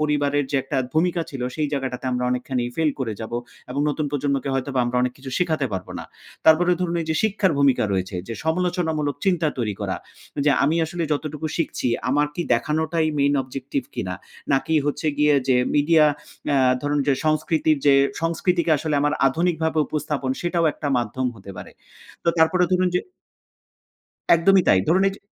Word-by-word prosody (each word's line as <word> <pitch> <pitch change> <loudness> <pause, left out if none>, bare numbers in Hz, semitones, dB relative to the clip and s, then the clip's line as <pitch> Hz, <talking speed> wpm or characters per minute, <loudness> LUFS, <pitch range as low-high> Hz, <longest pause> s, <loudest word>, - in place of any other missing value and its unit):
পরিবারের 145 -1 +1
যে 140 - +1
একটা 135 +1 -4 0.2
ভূমিকা 170 +2 +2
ছিল, 135 -3 -5
সেই 150 -1 0
জায়গাটাতে 130 -3 -3
আমরা 125 0 -1
অনেকখানি 125 0 -1
ফেইল 160 -2 +2
করে 120 -4 -2
যাবো 110 +2 -4 0.3
এবং 140 - -2
নতুন 150 +1 -2
প্রজন্মকে 140 -1 -1
হয়তোবা 135 0 -1
আমরা 120 +1 -2
অনেক 125 - 0
কিছু 130 0 -8
শেখাতে 160 -6 0
পারবো 95 -2 -5
না। - - -7 0.4
তারপরে 170 +3 +6
ধরুন, 175 -2 -1
এই - - -8
যে - - +1
শিক্ষার 205 -4 +1
ভূমিকা 140 -5 +3
রয়েছে 95 0 -2
যে 115 - -4
সমালোচনামূলক 160 -4 0
চিন্তা 175 -4 +2
তৈরি 105 -4 -1
করা। - - -2 0.5
যে, - - +6
"আমি 155 +4 +2
আসলে 170 +1 -4
যতটুকু 150 +1 -3
শিখছি 155 -6 -1 0.2
আমার 145 +2 +2
কি 175 - -2
দেখানোটাই 160 +1 0
main 140 0 +3
objective 135 0 -5
কিনা? 90 0 -3 0.4
নাকি 135 +4 +1
হচ্ছে 145 +2 -2
গিয়ে 150 0 +4
যে 130 - +4 0.2
মিডিয়া" 155 +2 +5 0.4
অ্যা 140 - +2 0.3
ধরুন, 145 0 0
যে 140 - +4
"সংস্কৃতির 155 0 +1
যে 140 - +7 0.3
সংস্কৃতিকে 170 +1 0
আসলে 155 +1 -2
আমার 145 +1 +1
আধুনিকভাবে 160 +2 0
উপস্থাপন, 150 -3 -2
সেটাও 175 -1 0
একটা 145 - -4
মাধ্যম 120 +3 -2
হতে 100 -1 -11
পারে।" - - -9 0.5
তো - - +1
তারপরে 180 +3 +4
ধরুন, 185 0 +3
যে 180 - +3 1.3
একদমই 190 +3 +4
তাই। - - +6
ধরুন, 185 +4 +4
এই - - -3
যে - - -14
150 Hz, 175 wpm, -23 LUFS, 135-165 Hz, 1.3 s, যে